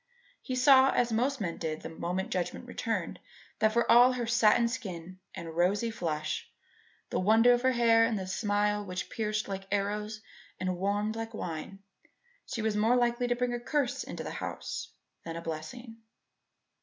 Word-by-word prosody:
He 255 - -4
saw, 265 +1 +6
as 245 -2 +1
most 260 +4 +1
men 175 -5 -3
did 160 -1 -4
the - - -5
moment 180 +6 -3
judgment 180 -4 -2
returned, - - -3 0.4
that 215 0 +4
for 235 +1 +3
all 245 +2 +7
her 245 -1 -2
satin 235 0 +4
skin 185 -7 -6 0.2
and 165 -3 -7
rosy 200 +7 +2
flush, 155 -7 -3 0.6
the - - 0
wonder 225 +5 +5
of 245 - +1
her 260 0 +3
hair 230 -1 +5
and 230 -1 +1
the 190 - -4
smile 205 +1 0
which 180 -2 -5
pierced 215 -2 -2
like 195 -1 -5
arrows 210 +2 -2 0.4
and 185 -1 -1
warmed 205 +3 0
like 225 0 -5
wine, 180 +2 -6 0.6
she 235 -4 -3
was 220 -1 0
more 220 +4 +3
likely 240 0 +1
to 245 - +1
bring 245 0 -1
a 240 - -2
curse 265 +1 -1
into - - -6
the - - -5
house - - -5 0.3
than 165 0 -6
a 165 - -5
blessing. 225 +10 -6
215 Hz, 175 wpm, -30 LUFS, 185-240 Hz, 0.6 s, all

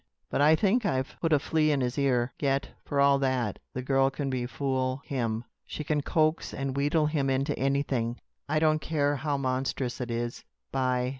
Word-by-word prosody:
But - - +1
I 155 +2 +6
think 215 +7 +2
I've 130 -9 -1
put 165 - +1
a 150 - +6
flea 155 +2 +1
in 140 -2 +1
his 125 0 -1
ear. 130 -3 +1
Yet, 140 -1 +1 0.2
for 140 - -1
all 140 0 +5
that, 130 -6 0 0.2
the 130 - -3
girl 135 +1 +3
can 135 0 -3
befool 130 +1 -1
him. 115 -4 -2 0.2
She 150 - -6
can 150 0 0
coax 155 +1 +1
and 135 -1 -3
wheedle 145 +3 +2
him 150 -3 0
into 135 +3 0
anything, 135 -3 0 0.3
I 155 - +2
don't 155 0 +3
care 145 -2 0
how 145 +1 -1
monstrous 130 -1 -2
it 125 - -3
is. 120 0 -3 0.3
"By 125 -1 +1
135 Hz, 190 wpm, -28 LUFS, 130-150 Hz, 0.3 s, I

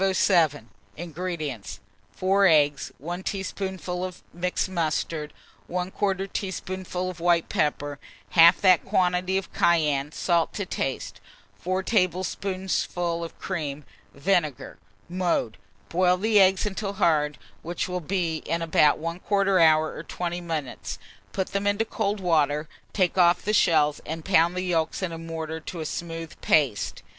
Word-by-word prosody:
507. 170 - +2 0.3
INGREDIENTS. 160 - -5 0.3
4 195 +1 +3
eggs, 145 -4 +3
1 175 +6 -5
teaspoonful 190 -2 -4
of 185 -1 -6
mixed 180 +2 -1
mustard, 160 -3 -2 0.4
1/4 190 +2 -1
teaspoonful 185 -1 -4
of 180 - -13
white 170 -1 +2
pepper, 145 -1 -1 0.3
half 170 +1 +7
that 185 -3 +5
quantity 180 +1 +1
of 195 - -5
cayenne, 150 -4 +2
salt 170 0 +1
to 200 - -3
taste, 135 -6 -4 0.4
4 185 +1 -1
tablespoonfuls 185 -3 -1
of 165 - -8
cream, 150 -6 -4 0.3
vinegar. 155 -2 -1 0.3
Mode. 175 -10 -1 0.3
Boil 180 +1 +3
the 210 +2 +3
eggs 190 0 +4
until 200 0 -3
hard, 155 -6 +2 0.2
which 175 +2 -3
will 180 -1 -3
be 170 -1 -1
in 165 0 -1
about 150 -2 +4
1/4 185 +4 +1
hour 155 -1 +4
or - - -6
20 175 +1 -4
minutes; 155 -7 -4 0.3
put 190 -1 -2
them 200 0 -1
into 205 +2 +1
cold 210 -2 -2
water, 150 -4 +1 0.2
take 185 -1 +1
off 175 0 +4
the 210 - 0
shells, 155 -7 +3
and 160 0 -5
pound 175 -2 +3
the 185 - -1
yolks 165 0 -1
in 180 - -1
a 165 - -6
mortar 160 -1 -5
to 165 +2 -7
a 160 - -4
smooth 165 0 -5
paste. 140 -10 +1
175 Hz, 140 wpm, -25 LUFS, 160-185 Hz, 0.4 s, half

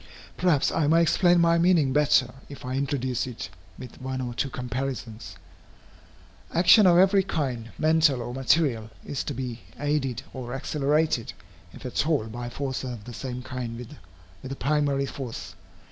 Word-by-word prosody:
Perhaps 175 -6 +2
I 160 -3 +1
may 165 +2 +5
explain 175 +1 +4
my 170 0 +4
meaning 165 -6 +3
better, 135 -3 +3 0.2
if 140 -3 -10
I 130 - -3
introduce 130 -3 -1
it 115 -9 -7 0.3
with 125 -1 -11
one 130 0 -3
or 125 -2 -3
two 135 - -1
comparisons. 125 -3 -5 1.2
Action 185 +4 +6
of 175 -1 +6
every 195 +2 +5
kind, 135 -11 -3
mental 155 -5 +3
or 120 - -6
material, 130 -4 +1 0.2
is 140 - -3
to 145 - -4
be 125 -2 -4 0.2
aided 135 -4 -1
or 125 -1 -5
accelerated, 145 -2 0 0.4
if - - -12
at 125 +4 -1
all, 155 -8 +2
by 120 +2 -6
forces 130 0 -4
of 110 -4 -9
the 120 - -9
same 125 +1 -5
kind 125 -3 -5
with 125 +4 -9 0.5
the 135 - -4
primary 140 0 +1
force. 130 -3 -7
135 Hz, 160 wpm, -26 LUFS, 125-150 Hz, 1.2 s, Action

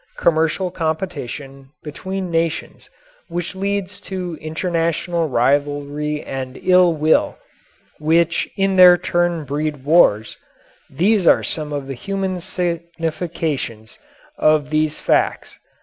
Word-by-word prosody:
Commercial 165 +3 +1
competition 150 -5 -4
between 185 +4 -5
nations, 165 -1 -2 0.4
which 175 +1 -4
leads 200 0 -3
to 180 -3 -5
international 170 0 -1
rivalry 145 +4 0
and 130 -1 -6
ill 180 -1 +5
will, 155 +1 +2 0.6
which 165 +2 +2
in 195 -1 +1
their 180 -1 +9
turn 175 -2 0
breed 145 0 -3
wars 125 -9 +3 0.5
these 185 +5 +2
are - - +5
some 150 -2 -4
of 145 -2 -3
the 135 - -5
human 190 +5 -3
significations 165 - -4 0.4
of 155 -1 +3
these 155 0 +1
facts. - - 0
165 Hz, 105 wpm, -20 LUFS, 145-180 Hz, 0.6 s, their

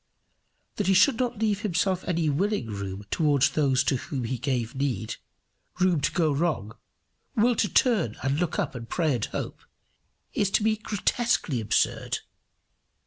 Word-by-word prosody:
That 205 - -1
he 190 - +4
should 220 +6 +5
not 245 -2 -1
leave 210 -2 0
himself 185 -2 0
any 170 -3 +1
willing 180 - 0
room 100 -2 -5
towards 145 -4 +3
those 135 -4 +2
to 135 - +1
whom 130 +1 -4
he 120 +1 -3
gave 125 -3 -1
need, 130 -5 -2 0.6
room 180 -5 +3
to - - +1
go 160 -4 +2
wrong, 140 - -1 0.6
will 235 +2 +3
to 205 - +2
turn 215 - +2
and 135 +3 0
look 175 -2 -1
up - - -1
and 115 -2 -8
pray 160 -5 +1
and 120 -4 -1
hope, - - -5 0.7
is 200 - +1
to - - -4
me 220 0 +3
grotesquely 210 - 0
absurd. 105 - +1
155 Hz, 160 wpm, -26 LUFS, 125-205 Hz, 0.7 s, should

